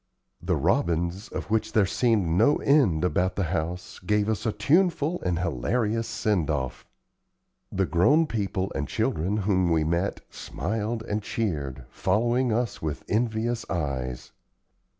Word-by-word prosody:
The - - 0
robins, 85 +5 0
of - - -6
which 110 0 0
there 105 -3 +4
seemed 110 -1 +2
no 100 - +4
end 130 - +3
about 90 0 +1
the 100 - 0
house, 90 +1 -3
gave 105 +3 +1
us 110 +1 -1
a - - +2
tuneful 170 - +2
and 90 -2 0
hilarious 105 - 0
send 105 -8 0
off; 65 -4 -3 0.8
the 95 0 +1
grown 145 - +4
people 100 - -2
and 75 - -2
children 90 +10 0
whom 95 -3 +1
we 80 -2 +2
met 85 +5 -1
smiled 110 - -3
and 105 -1 -2
cheered, 75 - -3
following 120 +6 +1
us 115 0 -1
with 75 -3 -3
envious 115 +2 0
eyes. 65 -7 -3
100 Hz, 140 wpm, -26 LUFS, 85-115 Hz, 0.8 s, there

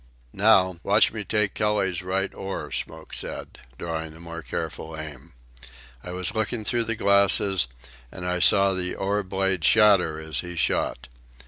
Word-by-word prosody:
"Now, 95 -3 +4
watch 105 +4 +3
me 110 -2 -4
take 105 0 0
Kelly's 105 -4 0
right 95 +1 -2
oar," 95 0 -5
Smoke - - -5
said, - - -6 0.2
drawing 80 -1 -5
a - - -14
more 85 0 -7
careful 80 +1 -5
aim. 75 -5 -8 0.7
I 90 - -7
was 90 +3 -3
looking 110 0 -2
through 120 +2 +1
the 115 - -2
glasses, 100 -5 +3 0.4
and 90 - -7
I 90 0 -1
saw 100 +1 +5
the 90 -1 -2
oar 100 +2 0
blade 95 -2 -1
shatter 100 -6 +5
as 80 -1 -3
he 90 -1 -6
shot. 85 - -1
95 Hz, 155 wpm, -25 LUFS, 85-105 Hz, 0.7 s, saw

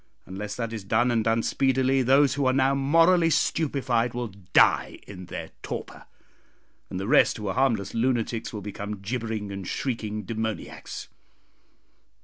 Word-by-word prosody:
Unless 100 +2 -6
that 115 -2 -4
is 110 -3 -5
done, 115 +5 +2
and 115 -2 +1
done 115 +1 +1
speedily, 130 0 +2
those 135 +2 +4
who 140 -2 0
are 130 - +3
now 135 +1 +3
morally 165 +5 +4
stupefied 130 -7 0
will 120 -2 -3 0.2
die - - +4
in 90 -3 -10
their - - -7
torpor, - - -7 0.8
and 90 - -4
the 95 - -3
rest - - +4
who 105 -2 -5
are 95 - -1
harmless 115 -7 +1
lunatics 115 -1 -1
will 105 - -6
become 105 0 -6
gibbering 110 -1 -3
and 95 -2 -6
shrieking 110 -5 -3
demoniacs. 110 +1 -5
115 Hz, 150 wpm, -26 LUFS, 105-130 Hz, 0.8 s, those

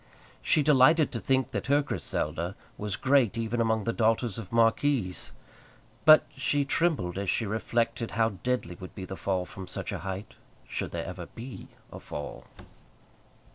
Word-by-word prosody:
She 150 - +3
delighted 150 +2 +5
to 115 - -3
think 130 +1 +1
that - - -3
her 145 +1 +4
Griselda 85 - -2 0.2
was 105 -2 -3
great 130 -5 +3
even 115 +1 -1
among 110 -1 +1
the 115 - -1
daughters 115 -1 +1
of 100 -5 -8
marquises; 115 -3 +2 0.7
but 155 0 +9
she 140 +1 +1
trembled 135 - 0
as 100 -2 -2
she 115 - +1
reflected 115 +2 -1
how 115 -1 +4
deadly 125 -9 -1
would 95 - -9
be 95 - -6
the 95 - -6
fall 95 -2 -1
from 95 0 -9
such 95 +3 -3
a 100 - -3
height 95 +4 -6 0.3
should - - -3
there - - -4
ever - - -7
be 120 +3 -9 0.3
a - - -7
fall! 75 -1 -7
115 Hz, 165 wpm, -28 LUFS, 95-130 Hz, 0.7 s, but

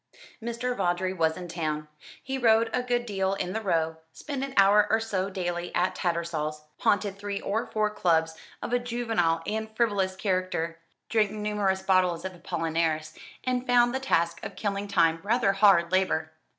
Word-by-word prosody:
Mr. 235 +2 -2
Vawdrey 185 -1 0
was 160 -3 +1
in 180 -1 -6
town. 155 -3 -3 0.4
He 265 0 -3
rode 225 -1 +4
a 250 - +1
good 245 -1 -1
deal 195 -3 -1
in 185 -1 -3
the 220 - -2
Row, 165 -5 0 0.2
spent 280 -3 -5
an 275 -1 -5
hour 205 +1 +6
or 225 - +3
so 200 -4 -2
daily 175 -2 -3
at 180 - +2
Tattersall's, 165 -3 -2 0.2
haunted 200 -1 +1
three 200 0 -3
or 220 +4 -2
four 215 -1 0
clubs 160 -5 +1 0.3
of 245 - -3
a 245 - +3
juvenile 225 -9 0
and 220 +1 -3
frivolous 200 -5 +1
character, 185 -4 -1 0.3
drank 215 -2 +2
numerous 210 -2 -1
bottles 185 -2 +2
of 190 - -4
Apolinaris, 165 -3 -2 0.3
and 255 0 -1
found 240 0 +4
the 265 - 0
task 170 -10 0
of 195 - -6
killing 200 0 -2
time 165 -4 +3
rather 215 +1 +2
hard 195 -4 +5
labour. 185 -4 +1
195 Hz, 170 wpm, -27 LUFS, 170-220 Hz, 0.4 s, hour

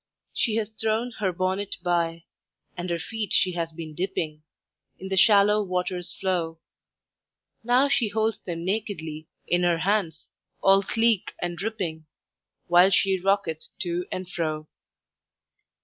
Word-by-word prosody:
She 225 -3 +1
has 220 -1 -1
thrown 220 +2 -1
her 195 -3 +1
bonnet 185 +3 -1
by, 170 -2 0 0.5
And 175 0 -4
her 170 - 0
feet 210 +3 -4
she 185 - +4
has 170 -2 -3
been 160 -1 -8
dipping 165 -3 -3 0.6
In 190 - -7
the 190 - 0
shallow 210 +2 +6
water's 180 -2 -2
flow. 175 -4 -1 1.1
Now 250 +4 +4
she 245 -4 +2
holds 220 +1 0
them 170 -2 -5
nakedly 185 -7 -3 0.2
In 175 0 +2
her 175 -1 +3
hands, 170 -3 0 0.3
all 195 0 +5
sleek 225 0 +1
and 175 0 -2
dripping, 175 -5 -4 0.6
While 175 +2 +6
she 190 0 +3
rocketh 185 -4 0
to 175 0 -2
and 185 0 -4
fro. 155 -3 -3
185 Hz, 135 wpm, -26 LUFS, 170-205 Hz, 1.1 s, shallow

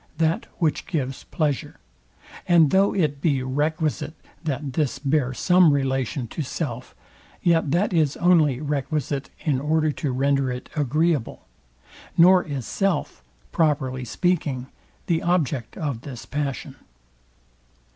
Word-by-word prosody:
that 165 0 +1
which 160 -3 0
gives 135 -6 -3
pleasure; 150 -5 -2 0.7
and 165 -4 +5
though 195 +1 +4
it 150 -7 0
be 140 -6 +1
requisite, 155 +3 -1 0.3
that 140 -3 -3
this 145 -1 0
bear 135 -1 +1
some 180 +4 +4
relation 135 -2 -1
to 155 - -5
self, 130 -3 -5 0.5
yet 165 -3 +3
that 180 +7 +1
is 155 -4 +2
only 160 -7 +4
requisite 145 -1 -2
in 145 -5 0
order 155 +2 +1
to 145 -1 -3
render 135 0 +1
it 125 0 -7
agreeable; 150 -1 0 0.7
nor 180 +2 +7
is 140 -5 -5
self, 195 -1 -1 0.3
properly 140 -6 0
speaking, 145 -2 -1 0.4
the 165 -2 +1
object 150 -9 -1
of 140 -7 -3
this 130 -4 -8
passion. 140 -1 -4
145 Hz, 125 wpm, -24 LUFS, 135-165 Hz, 0.7 s, nor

